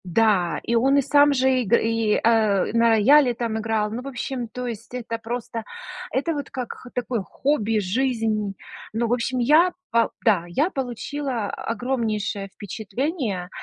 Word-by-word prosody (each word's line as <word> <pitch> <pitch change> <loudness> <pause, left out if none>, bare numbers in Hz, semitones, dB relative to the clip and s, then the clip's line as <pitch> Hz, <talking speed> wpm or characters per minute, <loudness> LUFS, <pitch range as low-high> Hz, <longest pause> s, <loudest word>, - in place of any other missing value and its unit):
Да, 185 -1 +2
и 235 - -2
он 270 +4 +4
и - - +5
сам 290 +2 +5
же 260 -1 +2
иг 230 -1 -2
и 225 -2 +2
э, 220 -4 +3
на 230 0 +4
рояле 245 +4 +5
там 225 -1 -2
играл. 215 -1 -1
Ну, 235 +3 -4
в 265 - -9
общем, 250 -1 -4
то 250 +3 -6
есть, 230 -1 -7
это 230 -2 -4
просто 230 0 -5 0.5
это 290 +6 0
вот 285 -2 -5
как 250 -3 -5
х 250 - -13
такое 245 -2 -2
хобби, 225 - 0
жизнь. 215 -1 -1 0.4
Ну, 230 +1 0
в 235 - +1
общем, 250 +1 -1
я, 305 +9 +4 0.2
по 230 0 +3 0.2
да, 195 -7 +3
я 290 - 0
получила 265 - -3
огромнейшее 225 -4 -2
впечатление. 215 - -3
230 Hz, 165 wpm, -23 LUFS, 215-260 Hz, 0.5 s, и